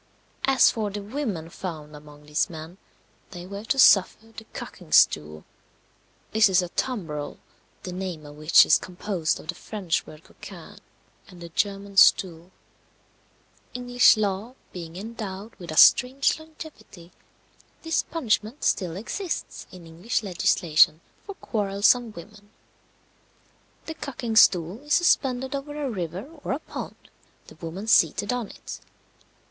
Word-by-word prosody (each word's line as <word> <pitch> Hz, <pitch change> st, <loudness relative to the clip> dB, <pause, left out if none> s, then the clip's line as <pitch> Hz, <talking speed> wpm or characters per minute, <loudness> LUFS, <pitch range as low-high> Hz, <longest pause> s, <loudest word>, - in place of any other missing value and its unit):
As 270 Hz, -1 st, +5 dB
for 215 Hz, -2 st, -3 dB
the 205 Hz, 0 st, -6 dB
women 210 Hz, -, -4 dB
found 155 Hz, -5 st, -7 dB
among 150 Hz, 0 st, -15 dB
these 150 Hz, 0 st, 0 dB
men, 165 Hz, +3 st, -10 dB, 0.5 s
they 175 Hz, -1 st, -9 dB
were 200 Hz, +2 st, -8 dB
to 270 Hz, -, 0 dB
suffer 220 Hz, -1 st, +4 dB
the 225 Hz, -, -10 dB
cucking -, -, -10 dB
stool 75 Hz, +1 st, +3 dB, 0.9 s
this 220 Hz, -1 st, +4 dB
is 185 Hz, -1 st, +3 dB
a 175 Hz, -, -5 dB
tumbrel, 165 Hz, -, -4 dB, 0.5 s
the 180 Hz, -, -6 dB
name 180 Hz, -4 st, -5 dB
of 145 Hz, 0 st, -11 dB
which 155 Hz, +2 st, +6 dB
is -, -, +4 dB
composed 180 Hz, -3 st, -3 dB
of -, -, -13 dB
the -, -, -1 dB
French 185 Hz, -2 st, -3 dB
word 155 Hz, +1 st, -13 dB
coquine, -, -, -13 dB, 0.5 s
and 180 Hz, -4 st, -15 dB
the 170 Hz, 0 st, -9 dB
German 200 Hz, +3 st, -3 dB
stuhl. 175 Hz, -3 st, +4 dB, 1.3 s
English 245 Hz, -1 st, +4 dB
law 210 Hz, +4 st, -2 dB, 0.2 s
being 170 Hz, -2 st, -8 dB
endowed 210 Hz, 0 st, -7 dB
with 175 Hz, -2 st, -11 dB
a 155 Hz, -, -6 dB
strange 265 Hz, +5 st, +5 dB
longevity, 310 Hz, -, -13 dB, 0.7 s
this 325 Hz, -1 st, +1 dB
punishment 240 Hz, -4 st, -2 dB
still 175 Hz, -4 st, 0 dB
exists 330 Hz, -, -5 dB
in 180 Hz, -2 st, -12 dB
English 170 Hz, +9 st, -3 dB
legislation 165 Hz, -4 st, +3 dB, 0.3 s
for 400 Hz, -, -7 dB
quarrelsome 215 Hz, -, +1 dB
women. 205 Hz, +3 st, -13 dB, 1.4 s
The 320 Hz, -, -5 dB
cucking 255 Hz, -7 st, -5 dB
stool 180 Hz, +2 st, +3 dB
is 295 Hz, +1 st, 0 dB
suspended 265 Hz, -6 st, +1 dB
over 290 Hz, +2 st, -5 dB
a 280 Hz, -3 st, -2 dB
river 185 Hz, -, -5 dB, 0.2 s
or -, -, -2 dB
a 275 Hz, -, -3 dB
pond, -, -, -8 dB, 0.5 s
the -, -, -15 dB
woman 175 Hz, +5 st, -6 dB
seated 205 Hz, +1 st, +3 dB
on 245 Hz, -3 st, -3 dB
it. -, -, -10 dB
200 Hz, 140 wpm, -25 LUFS, 170-240 Hz, 1.4 s, which